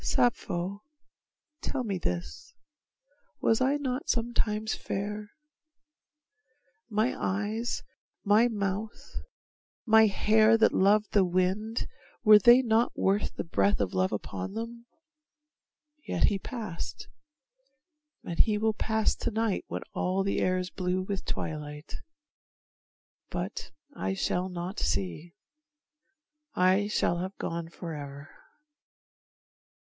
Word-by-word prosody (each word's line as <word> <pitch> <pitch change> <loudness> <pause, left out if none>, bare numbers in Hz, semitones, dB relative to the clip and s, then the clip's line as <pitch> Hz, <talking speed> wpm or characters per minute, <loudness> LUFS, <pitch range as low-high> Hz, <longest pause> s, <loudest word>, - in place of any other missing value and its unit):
Sappho, 200 -5 0 0.8
tell 265 -3 -2
me 200 -5 -2
this, 85 - -4 0.8
Was 225 +2 +2
I 270 +3 +3
not 265 -1 -3
sometimes 220 -2 0
fair? 210 +1 -4 1.6
My 220 +3 +1
eyes, 215 +5 -2 0.4
my 215 +3 +5
mouth, 210 0 -4 0.7
My 220 -1 +7
hair 215 +2 +4
that 225 - +4
loved 205 +2 +3
the 200 - +4
wind, 185 +5 0 0.4
were 215 -2 +9
they 240 +5 +7
not 230 0 +2
worth 200 +2 +1
The - - -3
breath 100 - +1
of 100 -3 -1
love 95 0 +1
upon 100 - -4
them? 235 +1 -6 1.2
Yet - - 0
he 200 - -1
passed, 215 -8 -6 1.2
And 170 - -6
he 215 -1 +4
will 220 +1 +1
pass 220 0 +1
to - - -1
night 225 -3 -1
when - - -4
all 185 +1 0
the 195 - 0
air 185 0 +2
Is 185 0 -3
blue 185 0 -1
with 195 0 -4
twilight; 150 -1 -5 1.3
but - - -4 0.3
I 190 - -2
shall 185 -1 -1
not 180 +2 -5
see. 100 - -2 1.2
I 185 +3 +3
shall 175 -4 +1
have 190 +2 -5
gone 165 0 -4
forever. 145 -4 -8
200 Hz, 115 wpm, -29 LUFS, 175-220 Hz, 1.6 s, were